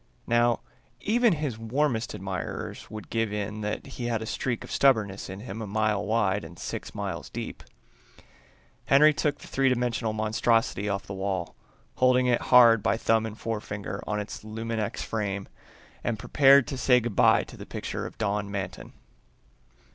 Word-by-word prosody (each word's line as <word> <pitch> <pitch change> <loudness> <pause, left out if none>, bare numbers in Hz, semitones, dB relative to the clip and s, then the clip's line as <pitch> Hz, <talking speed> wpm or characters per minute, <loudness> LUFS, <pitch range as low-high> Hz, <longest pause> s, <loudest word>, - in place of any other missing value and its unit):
Now, 120 0 +2 0.4
even 235 0 +3
his 145 -8 -3
warmest 120 +1 -1
admirers 95 -2 -5
would 110 0 -9
give 115 -2 0
in 105 +1 -3
that 105 0 -3
he 130 -3 -6
had 115 -2 0
a 110 - -5
streak 120 +1 -2
of - - -10
stubbornness 110 -9 +2
in 95 +2 -7
him 110 -1 -6
a 110 - -4
mile 105 0 0
wide 105 -2 +1
and 85 - -10
six - - -6
miles - - -4
deep. - - -6 1.2
Henry 150 +3 +6
took 150 -1 0
the - - -13
three 135 0 +2
dimensional 120 -2 0
monstrosity 110 0 +1
off 100 0 -2
the 100 - -6
wall, 95 -2 -3 0.4
holding 130 0 +4
it 125 -1 +2
hard 120 -3 +8
by 115 - +1
thumb 115 -1 +2
and 110 0 -8
forefinger 105 -3 -4
on 105 0 -1
its 105 0 -6
luminex 110 0 -3
frame, 100 -3 -3 0.6
and 115 -2 -1
prepared 135 +4 +5
to 135 -3 -5
say 125 -1 +5
good 120 -3 -4
by - - +5
to - - -12
the - - -10
picture - - -4
of - - -13
Don 105 -1 -1
Manton. 95 -2 -5
110 Hz, 170 wpm, -27 LUFS, 105-125 Hz, 1.2 s, hard